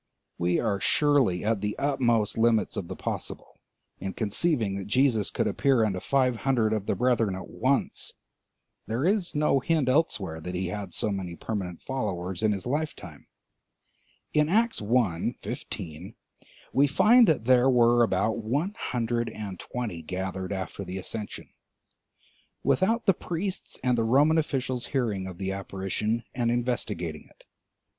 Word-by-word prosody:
We 85 0 +2
are 105 -4 0
surely 135 -10 +2
at 110 -2 +1
the 105 0 -2
utmost 120 -7 +1
limits 115 -1 +2
of 85 - -4
the - - -6
possible - - -6 0.4
in 95 +1 -4
conceiving 110 - 0
that 100 - -6
Jesus 115 -3 +3
could - - -1
appear 120 +2 +2
unto 95 -3 -1
five 130 +1 +1
hundred 115 -4 +1
of 105 -2 -2
the - - +1
brethren 115 -5 +2
at 95 - -7
once 135 +3 -1 0.8
(there 115 +7 -1
is 190 -3 +1
no 150 -2 +3
hint 155 0 +1
elsewhere 100 - 0
that 90 +2 -5
he 90 0 -2
had 100 -2 -5
so 105 - 0
many 95 -3 -4
permanent 90 -3 -5
followers 95 -8 -3
in 110 -1 +3
his 100 -2 -3
lifetime; 125 - -4 1.1
in 150 0 +3
Acts 225 - +2
i., 105 -6 +1
15, 85 +6 -6 0.6
we 140 +2 +5
find 230 - +6
that 140 -8 +2
there 130 +1 +5
were 120 -1 +5
about 110 +1 +1
one 140 - -1
hundred 120 -1 -1
and 105 -4 -7
twenty 115 -9 -5
gathered 95 +2 -4
after 95 0 -4
the 90 0 -6
ascension), 105 +2 -6 1.2
without 225 +5 +2
the 195 - +5
priests 180 +3 -4
and 125 -2 +2
the - - +2
Roman 145 +8 +4
officials 130 -5 -2
hearing 110 -9 -1
of 90 -2 -8
the 95 0 -2
apparition 100 +4 -2
and 120 -2 0
investigating 115 -9 -2
it. - - -23
115 Hz, 150 wpm, -27 LUFS, 95-135 Hz, 1.2 s, find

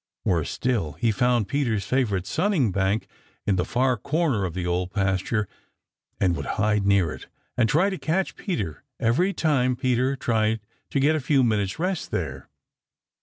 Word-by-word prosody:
Worse 85 -5 +1
still, 110 - -1
he 115 - +1
found 120 -1 +2
Peter's 120 -9 0
favorite 105 -6 0
sunning 160 - +1
bank 100 +3 0 0.4
in 100 - +2
the 90 - +1
far 125 +3 +1
corner 140 - 0
of 85 - -5
the 90 -1 -2
Old 90 +1 -1
Pasture 100 +1 0 0.7
and 90 -3 +2
would - - -5
hide 105 -1 +2
near 100 -5 +3
it - - -11 0.3
and 115 -2 +2
try 180 +7 +3
to 190 - -4
catch 180 +4 -1
Peter 105 - -4 0.2
every 140 - +2
time 130 -8 +1
Peter 130 +1 +1
tried 110 -3 +1 0.3
to 140 - 0
get 150 +3 +3
a - - +1
few 135 -1 +2
minutes' 105 -5 0
rest 180 +1 -2
there. - - -4
115 Hz, 170 wpm, -25 LUFS, 100-140 Hz, 0.7 s, near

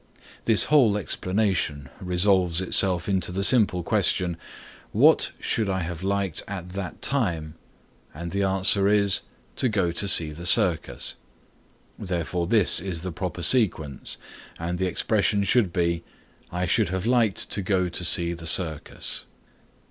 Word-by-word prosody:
This 110 -2 +5
whole 125 -9 +3
explanation 95 -8 -2
resolves 90 -1 +1
itself 95 -1 +2
into 95 -3 +1
the 95 +2 -2
simple 100 -6 +3
question, 90 +1 0 0.6
what - - +3
should 110 -3 -2
I 95 -1 -2
have 85 0 -6
liked 95 -2 -2
at 90 -3 -7
that 95 -1 -7
time, 85 - 0 0.6
and 85 +3 -8
the 100 - -2
answer 95 +1 +3
is 100 -1 +3 0.4
"to 130 - +2
go 95 -5 -1
to 95 +4 0
see 80 -5 +5
the 85 +4 -5
circus," 85 -1 +1 0.9
therefore 90 -2 -3
this 105 -1 +3
is 90 -4 -4
the 90 - -4
proper 90 0 -6
sequence, 85 - +1 0.4
and 85 +1 -5
the 95 - 0
expression 100 +3 0
should 100 -2 +1
be 85 -1 -1 0.5
"I 90 +1 -2
should 105 +1 +1
have 95 +1 -4
liked 115 -4 0
to 100 - -1
go 95 -1 0
to 90 +1 -3
see 85 0 +3
the 85 -1 -7
circus." 80 -2 0
95 Hz, 145 wpm, -24 LUFS, 85-100 Hz, 0.9 s, This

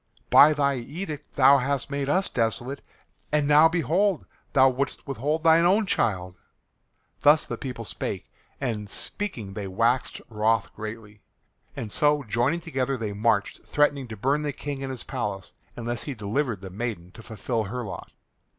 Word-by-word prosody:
By 150 +2 +8
thy 140 -2 +1
edict 150 +3 -7
thou 140 +1 +7
hast 140 +1 -2
made 140 0 -2
us 185 +6 +2
desolate. 120 +4 -2 0.5
And 150 -1 +2
now 150 +2 +7
behold 175 - +1 0.3
thou 135 -1 +6
wouldst 135 +1 -2
withhold 145 +5 -2
thine 165 0 +6
own 200 +5 +4
child!" 90 - -1 0.8
Thus 150 +1 +5
the - - -4
people 125 -4 -6
spake, - - -4 0.3
and 110 -6 -3
speaking 115 - -3
they 100 -1 -5
waxed 115 +6 0
wroth 110 -1 0
greatly, 110 -1 -8 0.5
and 110 - -5
so 150 +2 +3
joining 120 +9 0
together 135 -4 -2
they 110 -3 -4
marched 105 -1 0
threatening 145 -3 +1
to 110 -2 -8
burn 140 +8 +1
the 150 -1 -2
King 140 0 -5
in 135 - -4
his 130 -3 -6
palace 100 -2 -4 0.2
unless 120 0 -4
he 140 - -4
delivered 110 0 -2
the 95 -2 -8
maiden 100 -4 -5
to 110 - -12
fulfil 110 +1 -3
her 125 +5 -4
lot. 105 - -8
130 Hz, 160 wpm, -26 LUFS, 110-145 Hz, 0.8 s, By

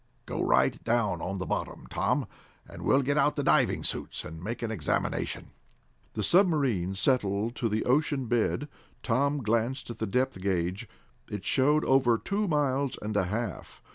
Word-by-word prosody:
Go - - -3
right - - +2
down 110 -7 +1
on 95 +2 -3
the 95 - -3
bottom, - - -3
Tom, - - 0 0.4
and - - -10
we'll 135 +1 +3
get 145 +2 +1
out 150 - +3
the 145 - -1
diving - - +3
suits - - -3
and 80 +2 -8
make 115 +4 -4
an 115 - -2
examination." 90 -10 -2 0.6
The 105 - -2
submarine 140 - +2
settled 105 0 +1
to 115 - 0
the 110 +1 -1
ocean 140 0 +1
bed. 120 +5 0 0.4
Tom 140 +3 +1
glanced 115 +4 0
at - - -9
the 110 - -1
depth 125 -1 0
gage. 95 +3 -1 0.4
It 105 -2 -5
showed 145 +3 +3
over 130 -3 +4
two 200 - -1
miles 140 -4 0
and 105 0 -4
a 100 - +2
half. 105 +1 -4
120 Hz, 170 wpm, -28 LUFS, 100-140 Hz, 0.6 s, over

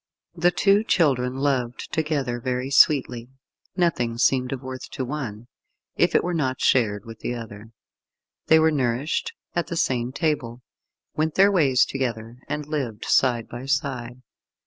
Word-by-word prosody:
The 175 +1 +3
two 195 +5 +3
children 130 - +1
loved 130 -4 -2
together 145 -7 -1
very 125 +2 -2
sweetly. 130 -4 +3 0.5
Nothing 120 -10 0
seemed 125 +1 +2
of 135 -1 -5
worth 130 -1 -7
to 130 - -3
one, 120 -6 -5 0.5
if - - +2
it - - +4
were 180 - -2
not 130 -6 -1
shared 105 -5 +2
with 115 -1 -10
the 125 - -3
other. 110 -2 -9 0.8
They 160 - +6
were 160 0 +4
nourished 135 +1 -1 0.2
at 170 -3 -1
the 170 - -4
same 125 -4 0
table, 125 -5 -2 0.5
went 155 0 -1
their 200 +1 +5
ways 140 -9 +4
together, 120 -3 -4
and 150 0 -3
lived 135 -8 -4
side 120 -3 +2
by 120 +3 -8
side. 125 -3 -2
130 Hz, 150 wpm, -24 LUFS, 120-150 Hz, 0.8 s, They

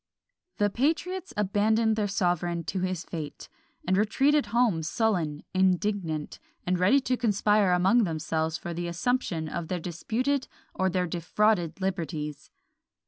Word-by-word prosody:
The 205 -1 +2
patriots 330 - -1
abandoned 215 +2 +2
their 210 -1 0
sovereign 175 -3 0
to 190 - -3
his 185 -2 -2
fate, 155 -4 -7 0.4
and 185 - +3
retreated 275 +9 +2
home 230 -8 +2
sullen, 165 -4 0
indignant, 185 -4 0 0.3
and 180 0 0
ready 195 +10 +5
to 255 -1 0
conspire 210 -4 +2
among 190 +7 +4
themselves 160 -2 -1
for 170 - -6
the 175 +1 -3
assumption 170 -3 -1
of 165 +1 -4
their 180 +1 -2
disputed 240 - -1 0.3
or 190 0 +1
their 180 0 0
defrauded 175 +1 0
liberties. 160 -6 -3
185 Hz, 135 wpm, -27 LUFS, 170-220 Hz, 0.4 s, ready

